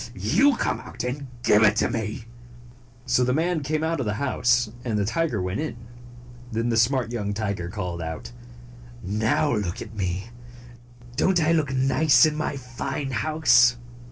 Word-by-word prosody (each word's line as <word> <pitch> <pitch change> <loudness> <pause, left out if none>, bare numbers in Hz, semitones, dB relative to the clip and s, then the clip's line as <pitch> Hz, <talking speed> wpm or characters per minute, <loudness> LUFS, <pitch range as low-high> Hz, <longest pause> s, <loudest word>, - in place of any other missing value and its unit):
You 285 -2 +3
come - - -1
out - - -7
and 135 +3 -4 0.2
give 105 -3 +5
it 105 -1 +5
to - - +2
me! 110 -1 -4 0.4
" 120 0 -24
So 125 - +2
the 125 +1 +1
man 165 +1 0
came 155 +2 -1
out 165 -1 -1
of 125 - -2
the 105 - -1
house, 125 -3 +1
and 115 -4 -1
the 100 - 0
tiger 150 0 -1
went 90 +2 -3
in. 150 -7 -4 0.7
Then 115 +1 -1
the 115 - +1
smart 120 0 +2
young 105 -4 -3
tiger 100 -5 -3
called 90 -3 -4
out, 80 -6 -6 0.7
"Now 110 +7 +1
look 105 0 -3
at 110 - -8
me! 95 +2 -3 0.9
Don't 190 -2 +3
I 160 0 +2
look 155 -5 +1
nice 135 +4 +4
in 155 -1 0
my 155 -2 -2
fine 130 +2 -5
house?" 130 -4 +4
120 Hz, 175 wpm, -24 LUFS, 105-145 Hz, 0.9 s, give